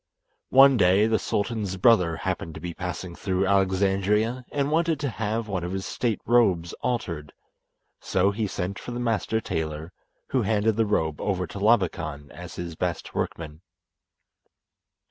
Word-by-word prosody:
One 135 Hz, 0 st, +7 dB
day, 95 Hz, +1 st, +4 dB
the 110 Hz, 0 st, +2 dB
sultan's 105 Hz, -3 st, -2 dB
brother 90 Hz, -5 st, +4 dB
happened 85 Hz, -3 st, -4 dB
to -, -, -7 dB
be 85 Hz, +1 st, -5 dB
passing 90 Hz, 0 st, -5 dB
through 95 Hz, +1 st, -1 dB
Alexandria, 100 Hz, +5 st, +1 dB
and 145 Hz, 0 st, 0 dB
wanted 165 Hz, -1 st, +1 dB
to 140 Hz, -, 0 dB
have 110 Hz, 0 st, -2 dB
one 95 Hz, -4 st, -2 dB
of 90 Hz, +2 st, -4 dB
his 95 Hz, 0 st, -3 dB
state 115 Hz, -4 st, -1 dB
robes 95 Hz, -8 st, +3 dB
altered, 85 Hz, -12 st, -3 dB, 0.7 s
so 95 Hz, +2 st, +1 dB
he 105 Hz, +1 st, -2 dB
sent 95 Hz, 0 st, -4 dB
for -, -, -9 dB
the 120 Hz, -, -4 dB
master 115 Hz, -2 st, 0 dB
tailor, 80 Hz, -4 st, -4 dB, 0.4 s
who 130 Hz, -, +1 dB
handed 110 Hz, 0 st, +1 dB
the 115 Hz, 0 st, +1 dB
robe 80 Hz, -7 st, 0 dB
over 95 Hz, -3 st, -1 dB
to 100 Hz, -, -8 dB
Labakan 85 Hz, -9 st, +1 dB
as 90 Hz, 0 st, -9 dB
his 85 Hz, -2 st, -6 dB
best -, -, -3 dB
workman. 80 Hz, -1 st, -4 dB
100 Hz, 155 wpm, -25 LUFS, 90-115 Hz, 0.7 s, One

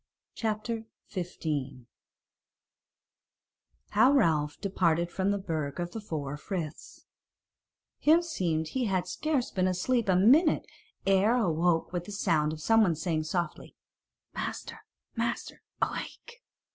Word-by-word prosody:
CHAPTER 220 Hz, +1 st, -2 dB, 0.2 s
15 150 Hz, -, -4 dB, 2.0 s
How 225 Hz, +6 st, +5 dB
Ralph 160 Hz, -, +2 dB
Departed 175 Hz, -3 st, +1 dB
From 190 Hz, +2 st, 0 dB
the 200 Hz, -, +1 dB
Burg 160 Hz, -7 st, -3 dB
of 175 Hz, 0 st, -3 dB
the 225 Hz, -, -6 dB
Four 150 Hz, -7 st, -4 dB
Friths 165 Hz, -2 st, -6 dB, 0.9 s
Himseemed 190 Hz, -, +2 dB
he 260 Hz, -2 st, -1 dB
had 185 Hz, -4 st, 0 dB
scarce 290 Hz, -, -1 dB
been 185 Hz, -1 st, +1 dB
asleep 205 Hz, +5 st, 0 dB
a 185 Hz, -, +5 dB
minute 270 Hz, -, +5 dB, 0.4 s
ere 195 Hz, +4 st, +4 dB
awoke 175 Hz, -6 st, +1 dB
with 175 Hz, -1 st, -3 dB
a -, -, -7 dB
sound 155 Hz, -6 st, +1 dB
of 155 Hz, -, -6 dB
someone 220 Hz, -7 st, +4 dB
saying 160 Hz, -1 st, -1 dB
softly, 170 Hz, 0 st, -3 dB, 0.6 s
"Master, -, -, -5 dB, 0.4 s
master, -, -, -3 dB, 0.2 s
awake!" 475 Hz, +1 st, -5 dB
185 Hz, 115 wpm, -29 LUFS, 160-220 Hz, 2.0 s, How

